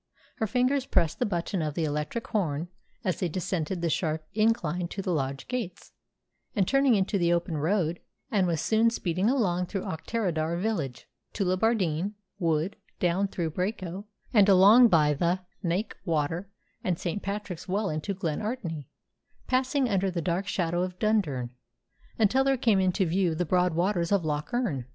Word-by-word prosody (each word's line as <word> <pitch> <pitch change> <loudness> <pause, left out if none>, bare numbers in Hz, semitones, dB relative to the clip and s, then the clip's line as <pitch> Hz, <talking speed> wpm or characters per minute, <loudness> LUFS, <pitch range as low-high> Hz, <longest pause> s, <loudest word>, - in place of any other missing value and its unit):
Her 220 - 0
fingers 255 +4 +1
pressed 165 -1 +1
the 250 - +1
button 175 -1 -2
of 150 -2 -2
the 165 - 0
electric 150 +10 -2
horn 170 -5 -1 0.3
as 185 -3 -1
they 180 - 0
descended 175 0 -2
the 170 - +2
sharp 155 -2 -1
incline 180 -6 +1
to 195 - -5
the 185 - 0
lodge 135 -2 -2
gates; 230 -9 -5 0.6
and, 195 -3 +2
turning 275 -3 +4
into 200 0 +1
the 170 -1 +2
open 170 -1 0
road, 165 +2 0 0.3
she 205 - +3
was 170 -4 +1
soon 225 +1 +3
speeding 185 -2 0
along 180 -9 +1
through 195 0 -3
Auchterarder 170 -2 -2
village, 165 - -2 0.3
skirted 185 -2 0
Tullibardine 195 -4 +1 0.3
Wood, 165 +1 0 0.2
down 180 +3 +2
through 170 -4 -3
Braco, 185 +1 -3 0.3
and 205 -3 +6
along 205 +6 +8
by 155 -7 +4
the 175 +5 0 0.2
Knaik 185 +5 0
Water 165 +2 -1 0.3
and 180 -3 0
St. 180 +4 -3
Patrick's 200 -3 -5
Well 195 +1 0
into 155 +6 -3
Glen 165 -6 -2
Artney, 175 - -4 0.6
passing 260 +1 +1
under 195 -3 +1
the 180 -2 -2
dark 175 +4 -1
shadow 175 -1 0
of 180 0 -3
Dundurn, 160 - 0 0.7
until 230 +5 +3
there 270 0 +2
came 225 -5 +3
into 185 +1 +2
view 175 -1 +1
the 180 +2 0
broad 180 0 +2
waters 175 0 +1
of 195 -5 +2
Loch 150 +4 -2
Earn. 220 - -1
185 Hz, 170 wpm, -28 LUFS, 165-210 Hz, 0.7 s, along